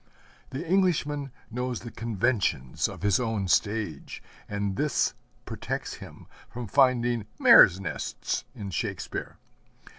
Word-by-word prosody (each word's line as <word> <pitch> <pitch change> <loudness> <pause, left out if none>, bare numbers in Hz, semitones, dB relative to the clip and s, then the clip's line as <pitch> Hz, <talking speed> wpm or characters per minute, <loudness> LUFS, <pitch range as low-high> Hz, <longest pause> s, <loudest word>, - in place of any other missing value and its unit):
The 140 +6 -5
Englishman 150 -7 +1 0.2
knows 125 0 -3
the 120 - -8
conventions 105 - 0
of - - -9
his 100 -2 +3
own 110 -5 -1
stage, 105 +3 -1 0.3
and 100 -1 -2
this 145 +4 +1 0.3
protects - - -4
him - - -11 0.2
from 120 0 -6
finding 120 -2 +2
mares' 90 +1 +8
nests 95 - -3
in 100 -5 -6
Shakespeare. - - -4
115 Hz, 115 wpm, -27 LUFS, 100-130 Hz, 0.3 s, mares